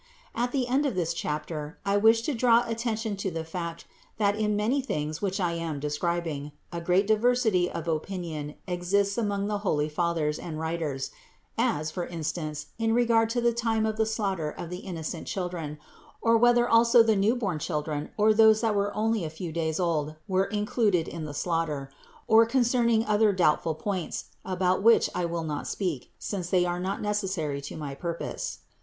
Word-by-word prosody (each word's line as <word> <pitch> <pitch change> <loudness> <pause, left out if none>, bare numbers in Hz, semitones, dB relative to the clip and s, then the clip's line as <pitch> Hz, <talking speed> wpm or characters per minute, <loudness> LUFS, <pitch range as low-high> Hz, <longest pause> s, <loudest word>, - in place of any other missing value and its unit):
678. 235 - -1
At 245 - -1 0.2
the 250 - -3
end 285 +3 +3
of 255 - -2
this 170 -2 0
chapter 150 0 -4
I 200 0 +2
wish 225 +2 +5
to 300 - -1
draw 235 -1 +4
atten 230 0 -1
tion 220 -2 -3
to 195 0 -2
the 165 -2 -4
fact 170 0 -5 0.3
that 205 -1 +2
in 210 -1 0
many 230 +7 +1
things 155 - -3
which 195 0 -1
I 175 -3 +1
am 165 -3 -3
describing, 150 0 -2 0.2
a 170 -1 -4
great 180 +4 +3
diversity 220 -4 +3
of 170 - -5
opinion 160 -2 -3
exists 195 +3 0
among 205 -3 -1
the 210 -1 -1
holy 150 -7 0
fathers 155 -1 -1
and 155 -2 -6
writers; 160 -4 -3 0.4
as, 155 +1 0
for 175 +1 -4
instance, 155 -2 -4
in 225 0 +2
regard 230 -2 +3
to 240 +1 0
the 235 0 +3
time 225 -2 0
of 220 0 -1
the 220 0 +2
slaughter 195 -8 -1
of 165 +3 -7
the 180 - -4
innocent 170 -3 -5
children, 175 -5 -4 0.4
or 230 0 +3
whether 240 +1 +5
also 235 +1 +6
the 220 -1 +3
new 205 +5 +3
born 195 -10 -2
children 150 -2 -3
or 215 +1 +5
those 220 0 +6
that 225 -2 +2
were 200 0 0
only 220 -1 +1
a 160 - -3
few 160 +2 -6
days 160 0 -1
old 155 -4 0
were 190 -1 +2
included 210 -4 +1
in 165 -2 -5
the 150 - -6
slaughter, 155 -6 -1 0.4
or 225 +1 +6
concerning 235 -2 +2
other 210 0 +4
doubtful 165 -3 +2
points, 185 +1 -4
about 185 0 +1
which 230 +3 +5
I 180 - -1
will 170 -1 -2
not 150 -2 -4
speak, 175 -10 -3
since 185 -4 -4
they 180 -1 +3
are 175 0 -1
not 190 +3 -3
necessary 190 -9 -1
to 140 - -7
my 145 -3 -5
purpose. 170 +4 -4
185 Hz, 190 wpm, -27 LUFS, 160-220 Hz, 0.4 s, also